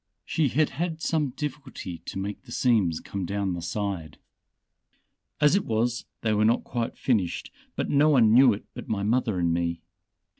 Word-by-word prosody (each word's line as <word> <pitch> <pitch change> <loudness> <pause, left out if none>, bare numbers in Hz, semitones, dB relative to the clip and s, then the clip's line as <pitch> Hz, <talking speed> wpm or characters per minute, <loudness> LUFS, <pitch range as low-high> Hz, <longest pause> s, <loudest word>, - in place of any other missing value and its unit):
She 155 -3 +1
had 150 +4 +1
had 165 +3 -3
some 155 -3 0
difficulty 130 - -6
to - - -5
make 100 +1 -4
the - - -15
seams 105 -10 +2
come 100 -1 -5
down 100 +1 -1
the 85 - -4
side. 90 -3 -3 1.2
As 150 +4 +5
it 200 - +2
was 115 +2 -1 0.2
they 110 -1 +1
were 105 0 +2
not 115 +2 +3
quite 120 -2 -3
finished, 105 -9 0 0.2
but - - -1
no 145 +2 +4
one 115 -7 +5
knew 130 +1 +7
it 105 - -4
but - - -9
my 100 -2 -1
mother 110 -1 +1
and 85 -1 +1
me. 85 0 -1
110 Hz, 180 wpm, -26 LUFS, 95-135 Hz, 1.2 s, knew